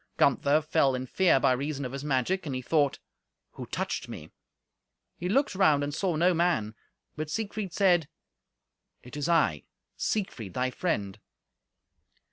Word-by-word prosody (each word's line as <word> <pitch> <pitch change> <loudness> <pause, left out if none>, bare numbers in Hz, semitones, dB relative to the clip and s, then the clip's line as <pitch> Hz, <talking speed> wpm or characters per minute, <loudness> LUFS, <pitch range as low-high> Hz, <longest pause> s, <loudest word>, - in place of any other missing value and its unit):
Gunther 145 +2 +3
fell 135 -3 +2
in 130 0 -4
fear 175 +2 +3
by 130 - +3
reason 140 +2 -2
of 125 - -5
his 140 +1 -6
magic, 150 +6 0
and 135 - -3
he 130 - -3
thought, 145 0 +2 0.5
"Who - - -8
touched - - -3
me?" - - -9 0.8
He 180 - -4
looked 275 +6 +2
round 155 -7 +3
and 145 0 -3
saw 180 +1 0
no 175 +4 +3
man. 165 -11 +1 0.4
But 155 0 -4
Siegfried 210 0 -3
said, 175 -5 +3 0.9
"It 125 - -11
is 150 +3 -2
I, 150 - +2 0.3
Siegfried, 120 - -3
thy 130 0 0
friend. 105 - -2
150 Hz, 150 wpm, -28 LUFS, 130-180 Hz, 0.9 s, Gunther